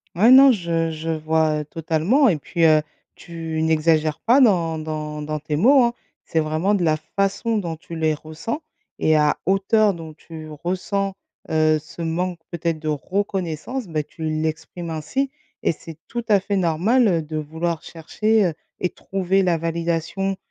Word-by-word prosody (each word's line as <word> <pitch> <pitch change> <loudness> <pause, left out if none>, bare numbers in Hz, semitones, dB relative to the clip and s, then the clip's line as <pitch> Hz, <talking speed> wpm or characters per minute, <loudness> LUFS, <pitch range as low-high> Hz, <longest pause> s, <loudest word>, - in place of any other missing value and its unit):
Ouais, 220 +8 +5
non, 265 0 +9
je 165 -4 -1
je 160 +1 -5
vois 155 -1 +1
totalement 165 - +2
et 170 - +1
puis, 170 +4 -2
heu, 155 -1 +6 0.3
tu 165 -2 -5
n'exagères 155 -1 +2
pas 245 +4 +4
dans 170 - +3
dans 155 -1 -4
dans 155 +1 -3
tes 150 0 -3
mots 260 - +6
hein. 235 0 +1 0.3
C'est 160 - -1
vraiment 155 +6 +1
de 195 -4 +1
la 155 -1 +3 0.2
façon 200 +3 +1
dont 170 -5 -3
tu 165 +1 -10
les 160 -1 +2
ressens 155 - -5 0.4
et 155 0 +3
à 150 0 +3
hauteur 195 +2 +3
dont 160 -2 -9
tu 155 0 -10 0.2
ressens, 190 +2 -1 0.3
heu, 155 -1 +3
ce 155 +3 -11
manque 170 +2 -2
peut-être 170 -2 -2
de 155 - -6
reconnaissance, 190 - -2
bah, 155 -2 -1
tu 160 - -11
l'exprimes 160 +2 -3
ainsi 165 - -2 0.3
et - - +2
c'est 160 0 -11
tout 240 0 -4
à 205 -2 +6
fait 200 +1 -2
normal, 190 +8 +3
heu, 170 -3 +1
de 155 0 -7
vouloir 160 +2 -3
chercher, 215 +6 0
heu, 170 - 0 0.3
et 180 - +1
trouver 195 +1 0
la 175 -2 +2
validation, 170 +3 -2
165 Hz, 170 wpm, -22 LUFS, 155-195 Hz, 0.4 s, non